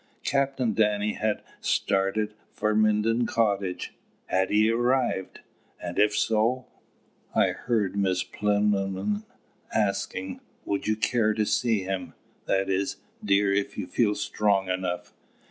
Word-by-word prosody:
Captain 135 -4 +1
Danny 105 0 +2
had 110 -1 -1 0.2
started 100 +2 0 0.2
for 105 0 0
Minden 110 +2 +2
Cottage.... 100 -5 0 0.3
Had 95 0 +1
he 110 +2 +4
arrived? 120 -4 0 0.4
And, 90 0 -4
if 105 0 +4
so 115 +5 +1 0.7
I - - +4
heard 110 -6 -1
Miss 95 -2 +1
Plinlimmon 105 0 0 0.5
asking: 100 -2 -1 0.3
"Would 100 - -2
you 110 - +2
care 110 0 +1
to 110 - +1
see 110 -1 +1
him 95 0 -4 0.3
that 95 0 +1
is, 95 0 0 0.3
dear, 100 -1 +3
if 100 0 -1
you - - -2
feel 105 +3 +1
strong 100 -2 +1
enough? 90 -1 -3
105 Hz, 125 wpm, -27 LUFS, 95-110 Hz, 0.7 s, he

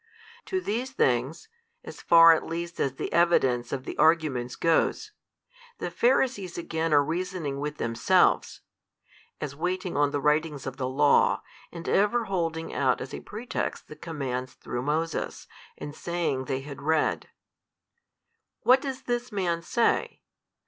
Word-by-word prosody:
To 375 - -1
these 245 - -2
things 135 - 0 0.4
(as - - -10
far 165 -1 +8
at 160 - -1
least 170 +1 -5
as 135 -1 0
the - - -5
evidence 130 -8 +2
of 135 -2 -3
the - - -6
arguments 150 -7 +2
goes) 165 -1 +1 0.7
the 175 - -4
Pharisees 235 -3 +1
again 165 -1 -2
are 145 -1 +5
reasoning 165 -3 -3
with 150 +1 -4
themselves 115 -3 +2 0.8
(as 140 -1 -5
waiting 180 +3 -2
on 145 0 +3
the 145 - -2
writings 150 0 0
of 135 0 -5
the 130 -1 -2
law, 145 +2 +3 0.3
and 170 -1 -8
ever 220 +4 +2
holding 165 -4 -2
out 130 -3 +1
as 130 - -7
a - - -5
pretext 225 +4 -5
the 150 - -9
commands 130 -6 -5
through 120 - -5
Moses, 155 +4 -2 0.3
and 145 - -7
saying 165 -6 -2
they 135 -1 -2
had 140 0 -9
read) 160 +1 0 1.3
What 260 +2 +5
does 270 -2 -5
this 240 0 -2
Man 175 -5 -1
say? 235 +7 0
160 Hz, 145 wpm, -27 LUFS, 140-180 Hz, 1.3 s, far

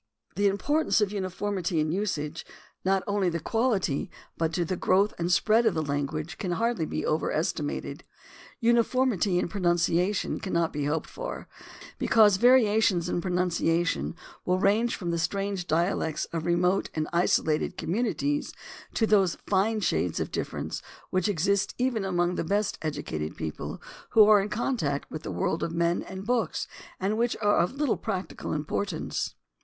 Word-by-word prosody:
The 200 0 +3
importance 290 +10 +1
of 210 -2 +1
uniformity 190 -2 -2
in 155 0 +1
usage, 165 -5 -2 0.4
not 190 0 +2
only 200 -3 +1
to 170 - -2
the 160 - -10
quahty, 225 - 0 0.3
but 165 -1 0
to 175 0 0
the 185 - -2
growth 195 +4 +2
and 170 +1 0
spread 220 +5 +4
of 200 - +2
the 160 - 0
lan 145 -1 -1
guage, 155 +4 -6
can 185 -4 -1
hardly 225 -5 0
be - - -3
overestimated. 155 -1 -2 0.6
Uniformity 235 -5 +2
in 180 - +1
pronimciation 175 +1 +1
cannot 170 -4 -1
be 145 -1 -2
hoped 150 +2 -1
for, - - -6 0.5
because 210 -4 +5
variations 220 -6 +4
in 175 - -1
pronunciation 175 -2 0 0.3
will 180 0 +1
range 215 +5 +2
from 175 -4 -3
the 170 - -1
strange 195 +1 -2
dialects 160 -1 0
of 165 0 -2
remote 180 +3 +2
and 155 -1 -1
isolated 160 -3 +1
communities 245 - -1 0.4
to 225 - +3
those 195 -5 +3
fine 210 +3 +1
shades 90 - 0
of - - -3
difference - - -4 0.3
which 185 +1 +1
exist 200 +2 +1
even 245 -4 0
among 175 -2 +1
the - - -2
best 200 +5 0
educated 145 - -4
people 80 -1 -5 0.4
who 215 -1 +9
are 210 -2 +7
in 200 - -3
contact 210 - -1
with 155 - -5
the - - -6
world 180 -4 -1
of 165 - -1
men 170 +1 +1
and 190 +1 -8
books 230 -7 0 0.3
and 205 +4 0
which 240 0 +1
are 205 -1 +3
of 180 +9 +1
little 285 -3 +1
practical 195 -4 -4
importance. 155 +7 -2
185 Hz, 160 wpm, -27 LUFS, 165-210 Hz, 0.6 s, who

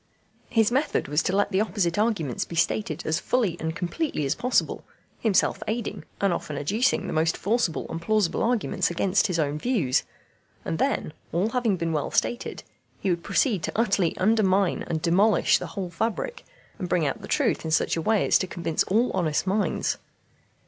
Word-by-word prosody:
His 225 -1 +3
method 280 +4 0
was 150 +3 +2
to 185 - -1
let 205 - +1
the 190 +1 +2
opposite 200 -4 0
arguments 205 - 0
be 170 - -8
stated 165 0 0
as 160 +2 +1
fully 220 -8 0
and 160 0 -3
completely 175 - -2
as 135 - +1
possible, 250 +1 0 0.4
himself 215 -5 +2
aiding, 225 +1 -3
and 200 -3 +2
often 150 -3 -4
adducing 210 - +1
the - - -4
most 160 +1 +1
forcible 210 -5 0
and 165 - -5
plausible 210 -2 +1
arguments 225 -5 +1
against 185 +4 +1
his 180 -3 -1
own 150 -1 0
views; 170 - +1 0.6
and 160 - -2
then, 270 - 0 0.2
all 180 +6 +1
having 230 -6 +1
been 165 -1 -2
well 150 -2 -1
stated, 240 - -1 0.4
he 190 - 0
would 170 -1 -2
proceed 220 - +1
to 160 - -3
utterly 200 -7 +1
undermine 195 -2 +2
and 160 -2 -2
demolish 200 +6 +4
the - - -5
whole 185 -3 -3
fabric, 230 - -3 0.3
and 180 - -4
bring 170 -3 +2
out 140 - -2
the - - -8
truth - - +1
in 160 - -3
such 160 - +2
a 165 - -1
way 215 +4 +2
as - - +4
to 185 - -2
convince 170 -3 -2
all 225 +6 +2
honest 165 -4 0
minds. 200 +2 0
185 Hz, 185 wpm, -25 LUFS, 165-220 Hz, 0.6 s, demolish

